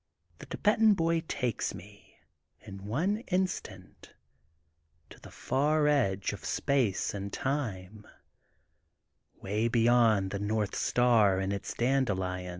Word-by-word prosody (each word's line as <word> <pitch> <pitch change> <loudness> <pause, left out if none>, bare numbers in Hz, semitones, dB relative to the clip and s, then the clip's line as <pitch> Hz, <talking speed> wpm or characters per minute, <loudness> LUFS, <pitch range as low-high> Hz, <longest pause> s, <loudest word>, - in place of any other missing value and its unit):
The - - -11
Thibetan 215 0 +3
Boy 165 -1 +1
takes 125 -4 -2
me, - - -15 0.4
in 100 -2 -11
one 165 - 0
in 190 0 +2
stant, 95 - -10 1.0
to - - -13
the - - -13
far 150 +3 0
edge 100 -10 +1
of - - -9
Space 130 -9 0
and 100 0 -5
Time, 110 -8 -4 1.4
way 105 +4 0
beyond 115 -4 +3
the 100 - -3
North 105 0 -1
Star 115 -6 +3
and 95 +1 -2
its 100 - -5
dande 130 +1 +1
lions. 90 -2 -3
115 Hz, 125 wpm, -29 LUFS, 100-140 Hz, 1.4 s, Thibetan